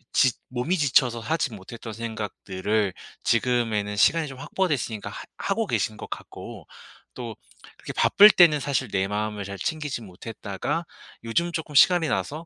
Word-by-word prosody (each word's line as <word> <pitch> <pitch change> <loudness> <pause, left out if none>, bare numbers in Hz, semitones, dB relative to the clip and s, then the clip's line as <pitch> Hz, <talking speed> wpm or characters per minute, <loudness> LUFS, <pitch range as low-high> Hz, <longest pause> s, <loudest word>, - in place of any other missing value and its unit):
지 130 - +6 0.2
몸이 130 +9 -1
지쳐서 130 -5 +3
하지 130 +2 -1
못했던 110 +3 -9
생각들을 105 -2 -2 0.3
지금에는 115 -4 +1
시간이 160 +9 +3
좀 135 -2 -9
확보됐으니까 140 - -2
하 - - -8
하고 - - -1
계신 - - -1
것 - - -8
같고 - - -9 0.5
또 120 -3 -6 0.4
그렇게 - - -7
바쁠 205 +1 +7
때는 165 -6 +6
사실 135 -2 -1
내 95 -1 0
마음을 105 0 -2
잘 100 0 -6
챙기지 150 - -3
못했다가 105 - -4 0.4
요즘 170 +10 0
쪼끔 160 -2 -5
시간이 170 +2 +6
나서 155 +3 -2
120 Hz, 330 characters per minute, -25 LUFS, 105-150 Hz, 0.5 s, 바쁠